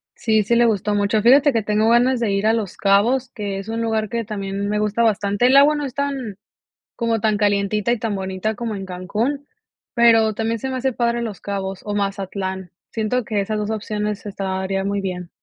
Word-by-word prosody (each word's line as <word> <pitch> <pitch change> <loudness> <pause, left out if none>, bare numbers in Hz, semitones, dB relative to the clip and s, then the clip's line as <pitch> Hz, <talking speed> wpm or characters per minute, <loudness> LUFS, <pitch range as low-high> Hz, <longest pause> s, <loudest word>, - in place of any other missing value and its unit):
Sí, 220 -2 +1
sí 235 +4 +1
le 240 0 +5
gustó 210 -2 +1
mucho, 205 +1 +1
fíjate 275 +6 +6
que 225 -2 +1
tengo 215 +2 +2
ganas 245 +2 +3
de 230 -3 0
ir 200 +1 0
a 220 - +4
Los 215 -5 -3
Cabos, 230 +6 +2
que 205 -4 -5
es 195 +3 -8
un 225 +1 -2
lugar 220 -2 -1
que 235 +1 -2
también 200 -1 -4
me 210 - 0
gusta 210 +2 0
bastante, 210 +1 +2
el 265 +2 +6
agua 290 +2 +6
no 295 -1 -2
es 265 - -6
tan 270 -8 -3 0.6
como 230 -2 0
tan 215 0 +1
calientita 205 +1 +1
y 240 - 0
tan 220 -1 -2
bonita 190 +2 -3
como 225 0 -4
en 195 - -5
Cancún, 215 +10 -3 0.5
pero 225 -2 +5
también 225 +2 -1
se 265 - -4
me 260 - -3
hace 260 +1 0
padre 235 0 0
Los 215 -5 -5
Cabos 195 -1 -4
o 205 - -3
Mazatlán, 195 -2 -3 0.2
siento 225 +2 -1
que 210 -2 -1
esas 215 +2 -2
2 210 0 -2
opciones 210 -1 -3
estaría 195 -1 -2
muy 200 0 -1
bien. 180 -2 -5
215 Hz, 215 wpm, -21 LUFS, 200-235 Hz, 0.6 s, fíjate